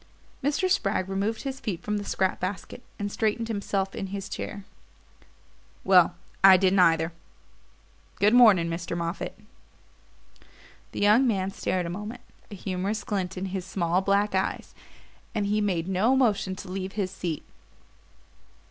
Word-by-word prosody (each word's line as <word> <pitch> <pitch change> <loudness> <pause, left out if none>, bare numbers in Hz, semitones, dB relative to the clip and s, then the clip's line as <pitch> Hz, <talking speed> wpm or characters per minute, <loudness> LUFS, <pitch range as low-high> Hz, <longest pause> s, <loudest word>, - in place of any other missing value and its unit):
Mr. 295 +7 +1
Spragg 195 - +1
removed 200 +3 -2
his 270 -1 -4
feet 205 -9 -4
from 210 0 -1
the 205 - -4
scrap 190 -1 -1
basket 185 +6 -5 0.2
and 205 -1 -3
straightened 225 +2 -1
himself 200 -2 -2
in 195 - -4
his 195 +1 -6
chair. 200 -1 -6 1.2
"Well 180 -2 +5 0.3
I 190 -1 +9
didn't 190 +1 +3
either; 165 -1 +3 1.0
good 210 +2 +3
morning, 215 -9 +6
Mr. 170 0 -4
Moffatt." 170 +2 -4 1.5
The - - -5
young 215 +6 +5
man 195 -4 0
stared 185 -2 -2
a - - -4
moment, 210 +6 -6 0.3
a 205 - -8
humorous 195 +3 -3
glint 190 -4 -3
in 185 - -3
his 190 -2 -2
small 180 -1 0
black 200 +1 +1
eyes; 190 0 -2 0.6
but 205 - 0
he 210 +1 +1
made 180 -5 -1
no 195 +7 +2
motion 210 -7 +1
to - - -9
leave 190 0 -4
his 195 -3 -2
seat. 175 -5 -4
195 Hz, 150 wpm, -26 LUFS, 185-210 Hz, 1.5 s, I